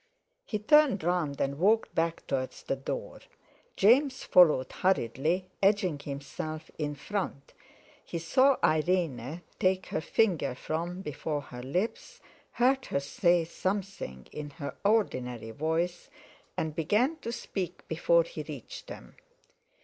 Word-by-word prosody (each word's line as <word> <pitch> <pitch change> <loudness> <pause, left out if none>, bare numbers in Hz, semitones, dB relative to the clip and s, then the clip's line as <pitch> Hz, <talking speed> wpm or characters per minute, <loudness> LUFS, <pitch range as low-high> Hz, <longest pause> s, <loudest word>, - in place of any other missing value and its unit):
He 215 - -1
turned 260 - +4
round 170 -5 0
and 140 +1 -1
walked 215 +5 +3
back 165 0 -1
towards 130 -1 -3
the - - -1
door. 135 - -5 0.6
James 260 +6 +4
followed 155 -8 +5
hurriedly, 170 +1 +1 0.2
edging 195 -6 +3
himself 145 +3 -6
in 150 -1 -2
front. 150 -2 -4 0.5
He - - -5
saw 260 +12 +4
Irene 155 -2 +1 0.2
take 185 0 +2
her - - -1
finger 160 - +1
from 170 +6 -3
before 150 0 -3
her 125 -3 -9
lips, 190 - -3 0.3
heard 260 +2 +2
her - - 0
say 170 +4 +2
something 185 - -4
in 150 -1 -6
her 140 -4 -5
ordinary 125 - 0
voice, 160 +7 -1 0.5
and 155 -1 -2
began 210 - +2
to 230 -6 -5
speak 190 -6 -5
before - - +3
he - - -7
reached - - -8
them. - - -10
170 Hz, 125 wpm, -29 LUFS, 145-205 Hz, 0.6 s, followed